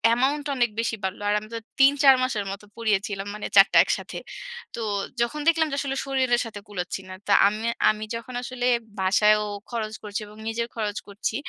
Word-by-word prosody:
amount 275 Hz, +4 st, +1 dB
টা 285 Hz, -, -2 dB
অনেক 240 Hz, -2 st, +3 dB
বেশি 230 Hz, -1 st, 0 dB
বাড়লো। 190 Hz, +2 st, -3 dB
আর -, -, +3 dB
আমি 215 Hz, -, -12 dB
তো 230 Hz, -, -2 dB, 0.2 s
৩ 275 Hz, +1 st, +7 dB
৪ 270 Hz, -1 st, +9 dB
মাসের 215 Hz, -6 st, -1 dB
মতো 200 Hz, +1 st, -8 dB
পড়িয়েছিলাম 205 Hz, -3 st, -1 dB
মানে 210 Hz, -, -5 dB
৪ 195 Hz, 0 st, +9 dB
টা -, -, +6 dB
একসাথে। -, -, -3 dB, 0.6 s
তো -, -, -6 dB, 0.4 s
যখন 235 Hz, +6 st, 0 dB
দেখলাম 325 Hz, -1 st, +4 dB
যে -, -, -1 dB
আসলে 270 Hz, -1 st, -2 dB
শরীরের 260 Hz, -3 st, +2 dB
সাথে 210 Hz, -2 st, -7 dB
কুলাচ্ছি 185 Hz, -2 st, -4 dB
না। -, -, -7 dB
তো 205 Hz, -, 0 dB, 0.2 s
আমে 215 Hz, +3 st, -2 dB, 0.2 s
আমি 215 Hz, 0 st, -1 dB
যখন 230 Hz, +2 st, -7 dB
আসলে 245 Hz, 0 st, -4 dB, 0.3 s
বাসায়ও 210 Hz, +2 st, +4 dB, 0.3 s
খরচ 220 Hz, -2 st, -3 dB
করছি 210 Hz, 0 st, -3 dB
এবং 210 Hz, +1 st, -14 dB
নিজের 230 Hz, +1 st, -1 dB
খরচ 210 Hz, -2 st, -2 dB
করছি। 205 Hz, +2 st, -3 dB
220 Hz, 200 wpm, -25 LUFS, 205-250 Hz, 0.6 s, ৪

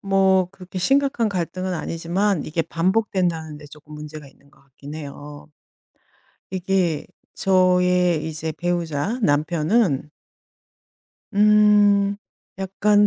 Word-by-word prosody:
뭐 190 Hz, -2 st, +2 dB
그렇게 185 Hz, -1 st, -9 dB
심각한 270 Hz, +2 st, +2 dB
갈등은 185 Hz, 0 st, -3 dB
아니지만 170 Hz, +2 st, -1 dB
이게 165 Hz, +1 st, -1 dB
반복된다는 175 Hz, -4 st, -1 dB
데 150 Hz, -, -12 dB
쪼금 150 Hz, +1 st, -14 dB
문제가 150 Hz, -1 st, -9 dB
있는 140 Hz, +1 st, -24 dB
것 140 Hz, -2 st, -25 dB
같긴 140 Hz, +2 st, -12 dB
해요. 145 Hz, -1 st, -9 dB, 1.0 s
이게 185 Hz, -4 st, 0 dB, 0.3 s
저의 180 Hz, -3 st, +2 dB
이제 160 Hz, 0 st, -4 dB
배우자 175 Hz, -, -2 dB
남편은 155 Hz, -, +1 dB, 1.2 s
음 205 Hz, -1 st, +4 dB, 0.4 s
약간 205 Hz, +2 st, +2 dB
180 Hz, 225 characters per minute, -22 LUFS, 155-195 Hz, 1.2 s, 음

